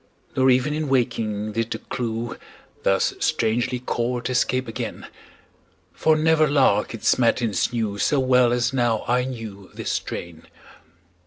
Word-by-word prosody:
Nor 130 0 +4
even 130 +4 +3
in 155 -1 -2
waking 115 -5 0
did 115 +1 -2
the - - -3
clew, 115 -1 -4 0.5
Thus 95 -1 +2
strangely 120 -4 0
caught, 120 0 -2
escape 130 0 +1
again; 115 - -5 0.9
For 160 0 +3
never 155 0 +3
lark 130 -7 +2
its 115 - +1
matins 115 -3 +1
knew 110 -4 -2
So 145 - +2
well 125 -2 +4
as 125 +2 +1
now 120 -4 +1
I 125 +1 +2
knew 110 -7 -7
this - - -3
strain. 85 -2 -5
120 Hz, 140 wpm, -23 LUFS, 115-130 Hz, 0.9 s, Nor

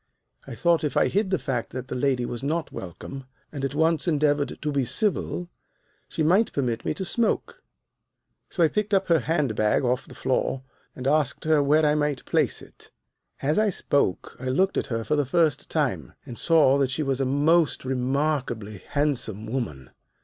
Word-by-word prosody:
I - - -7
thought 170 +5 +2
if 150 -4 -1
I - - +4
hid 200 0 0
the 190 - +2
fact 125 -7 -3
that 130 0 -5
the - - -5
lady 125 -1 0
was 120 - -5
not 155 +3 -2
welcome, 130 +9 -8 0.3
and 140 -3 -6
at 135 +1 -2
once 160 +2 +2
endeavored 145 -3 +1
to 150 - 0
be 140 -2 +1
civil, 180 - -1 0.6
she 160 - -2
might 190 +8 +3
permit 120 -5 -1
me - - -2
to 190 - -4
smoke. 230 +5 -1 0.9
So 175 - +1
I - - +6
picked 210 +5 -2
her 185 -4 +3
hand 140 -5 0
bag 105 +5 +2
off 125 +1 0
the - - -12
floor 130 0 -1 0.3
and 130 - -7
asked 145 -1 +1
her 155 -2 +4
where 150 +2 +3
I 150 - +4
might 150 -2 -1
place - - +1
it. - - -15 0.5
"As 150 +7 +2
I 215 -1 +3
spoke 140 - 0
I 130 - -7
looked 185 +10 +1
at - - -1
her 115 -2 -2
for 150 - 0
the 145 - +2
first 150 +1 +1
time, - - -1
and 120 - -8
saw 150 -2 +4
that 135 -2 +2
she 130 +4 -1
was 135 -1 -1
a - - +1
most 150 +3 +2
remarkably 130 -5 -1
handsome 125 -8 -1
woman. 100 - -4
140 Hz, 190 wpm, -25 LUFS, 130-160 Hz, 0.9 s, I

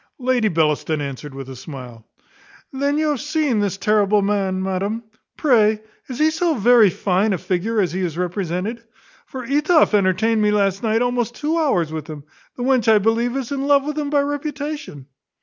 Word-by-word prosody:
Lady 250 -3 +1
Bellaston 155 -3 0
answered 140 0 -6
with 135 -1 -7
a 135 - -8
smile, 125 -4 -10 0.7
"Then 280 +2 0
you 310 0 +1
have 290 -5 -1
seen 295 -6 0
this 200 -2 -1
terrible 210 -1 +2
man, 195 -2 0
madam; 195 +4 -2 0.3
pray, 220 -7 +3 0.3
is 255 - -6
he 310 +2 +3
so 325 0 0
very 235 -2 +5
fine 195 +3 0
a - - 0
figure 195 +6 -1
as 185 -4 +1
he 185 - -3
is 170 -3 -3
represented? 180 +5 -3 0.4
for 260 -1 -7
Etoff 300 +2 +3
entertained 210 +3 +2
me 210 - +3
last 200 -2 +1
night 225 +1 +1
almost 245 -1 -1
two 305 +4 -1
hours 225 - +1
with 155 -2 -5
him. 150 -3 -8 0.3
The 245 - -5
wench 250 -3 +3
I 215 - +6
believe 230 +4 +1
is 265 -2 -4
in 275 0 -2
love 285 -1 +4
with 300 0 -3
him 295 -2 -2
by 290 -1 +2
reputation." 290 - -5
220 Hz, 185 wpm, -20 LUFS, 185-275 Hz, 0.7 s, I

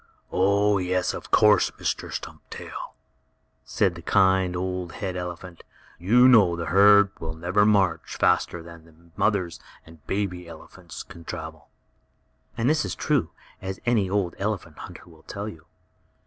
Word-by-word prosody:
"Oh, 100 +2 +2
yes, 90 0 0
of - - -8
course, 105 -1 +5
Mr. - - -3
Stumptail," - - -8 0.7
said - - 0
the - - -10
kind, 95 -2 +2
old 90 -1 -3
head 95 -4 -4
elephant. 90 -1 -7 0.4
"You 120 +8 +5
know 105 -9 +6
the 85 -1 -4
herd 100 0 +6
will 80 0 -5
never 90 +5 +2
go 95 -6 +3
faster 85 - 0
than 85 -1 -13
the 80 -1 -20 0.2
mothers 90 -6 0 0.3
and 80 -2 -17
baby 90 -3 -3
elephants 80 -1 -11
can 85 - -13
travel." - - -8 0.9
And 115 - 0
this 155 +2 +2
is - - -4
true, 140 - 0 0.3
as 95 -1 -5
any 110 -6 +2
old 95 -3 0
elephant 95 -6 -4
hunter - - -10
will 80 -2 -17
tell 100 +5 -6
you. 80 -7 -11
95 Hz, 150 wpm, -25 LUFS, 85-105 Hz, 0.9 s, know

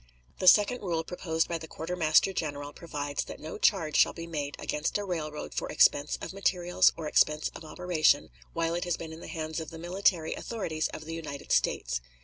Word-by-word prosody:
The 185 - 0
second 210 +6 +6
rule 170 -4 -1
proposed 165 -2 -1
by 170 -1 -2
the 160 - -8
quartermaster 165 +2 +2
general 145 -4 -4
provides 145 -4 -4
that - - -9
no 160 +6 -7
charge 165 -9 +2
shall - - +5
be 165 - -7
made 145 -4 -4
against 150 +6 -1
a 205 - -3
railroad 155 -5 -4
for - - -3
expense 145 +1 +4
of - - -5
materials 180 -2 +3
or 160 -2 -4
expense 150 0 +3
of - - -9
operation 155 -2 +1 0.2
while 165 0 0
it 175 +1 -2
has 175 -2 0
been 160 -1 -7
in 160 - -9
the - - -9
hands 160 0 -4
of 160 - -6
the 165 - -9
military 175 -1 +1
authorities 165 -9 -2
of 155 - -8
the 165 - -6
United 155 -4 -6
States. - - +1
160 Hz, 200 wpm, -29 LUFS, 155-175 Hz, 0.2 s, second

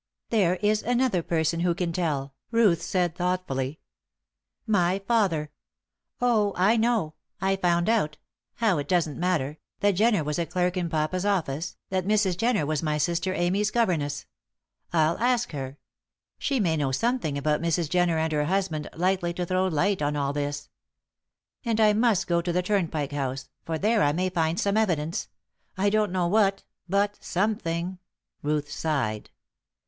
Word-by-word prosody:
"There 190 -6 +3
is 210 +1 +3
another 245 -5 +1
person 165 0 0
who 175 0 +1
can 175 -1 -2
tell," 145 -6 -1 0.2
Ruth 215 -8 +3
said, 175 -1 0
thoughtfully. 170 -6 -2 0.8
"My 190 -4 +2
father. 195 -8 0 0.7
Oh, 220 -5 +2
I 195 +5 +4
know 225 -9 +1 0.3
I 190 +1 +1
found 175 -2 +1
out 180 -10 +1 0.4
how, 215 -9 +2
it 145 - -4
doesn't 165 -5 0
matter 160 -5 0 0.2
that 205 0 +4
Jenner 210 -2 +2
was 150 +2 -2
a 170 - -1
clerk 180 +2 0
in 175 -2 -1
papa's 160 +4 -1
office, 170 -6 -1
that 185 -1 -1
Mrs. 205 -4 +2
Jenner 225 -5 +1
was 155 -1 -1
my 150 -1 0
sister 175 +5 0
Amy's 190 +4 +1
governess. 160 -12 0 0.7
I'll 160 0 +2
ask 240 0 +1
her. 135 -2 -5 0.6
She 275 -2 0
may 170 -6 +2
know 140 -3 0
something 225 - 0
about 150 +2 0
Mrs. 170 -1 0
Jenner 175 0 +2
and 160 0 0
her 150 -1 +1
husband 180 -3 -1
likely 175 0 0
to 180 - -2
throw 185 +1 +1
light 185 +2 +1
on 145 0 0
all 140 -1 -1
this. 145 0 -3 1.0
And 230 -3 0
I 215 -1 +5
must 215 -3 +2
go 170 -1 +1
to 175 +1 -2
the 180 +1 0
Turnpike 165 -8 -1
House, 135 -2 -3 0.2
for 165 -1 -2
there 215 +4 +2
I 145 - +3
may 185 +3 0
find 165 -1 0
some 200 +1 +1
evidence 170 -7 0 0.5
I 200 +1 +2
don't 215 -2 +2
know 180 -1 +1
what 195 +1 +2 0.3
but 200 +2 0
something." 180 -3 -1 0.4
Ruth 150 0 -1
sighed. 130 -10 -2
175 Hz, 165 wpm, -26 LUFS, 155-200 Hz, 1.0 s, I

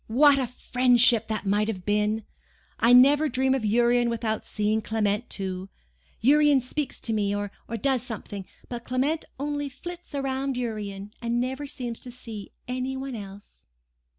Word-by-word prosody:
"What 275 +4 +5
a 260 - 0
friendship 245 -1 +3
that 215 -2 -3
might 205 +2 +2
have 190 -5 -4
been! 210 +1 +1 0.5
I 235 - +5
never 285 +5 +7
dream 260 +1 +2
of 265 -4 -1
Urian 240 +2 +3
without 225 -1 -2
seeing 215 +1 0
Clement 215 +1 -1
too—Urian 195 - +1
speaks 270 +3 -3
to 225 - 0
me, 205 -2 +1
or 205 -1 -3 0.3
does 270 -3 +1
something,—but 225 0 -8
Clement 270 +6 0
only 290 0 -2
flits 350 +4 -9
round 270 -1 -1
Urian, 210 -4 -4
and 235 0 0
never 265 +3 -2
seems 245 -4 -5
to 250 - -10
see 230 -4 -9 0.2
any 255 +1 -2
one 270 0 -5
else!" 200 -2 -10
240 Hz, 150 wpm, -26 LUFS, 210-265 Hz, 0.5 s, never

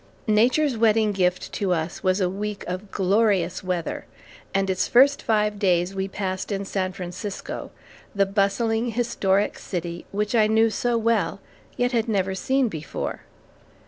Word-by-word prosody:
Nature's 245 +6 +3
wedding 220 -1 +3
gift 185 -2 0
to 195 -3 -1
us 165 -1 -2
was 185 +1 +2
a 185 - +2
week 205 +2 -4
of 185 +3 -5
glorious 195 -2 +1
weather, 180 -3 -3 0.4
and 195 0 +1
its 185 -1 0
first 275 +4 +5
five 210 -2 +1
days 180 -2 +2
we 190 0 -2
passed 190 0 -4
in 200 0 -2
San 190 -1 -2
Francisco, 185 +2 -6 0.5
the 200 0 +3
bustling, 220 +4 +1
historic 210 -4 0
city, 175 -2 -5
which 210 +2 -1
I 220 -2 +4
knew 220 +1 +3
so 240 +1 0
well, 220 -6 +1 0.4
yet 245 0 +1
had 230 -2 0
never 190 -3 0
seen 265 +7 +1
before. 155 -8 -5
200 Hz, 150 wpm, -24 LUFS, 185-225 Hz, 0.5 s, first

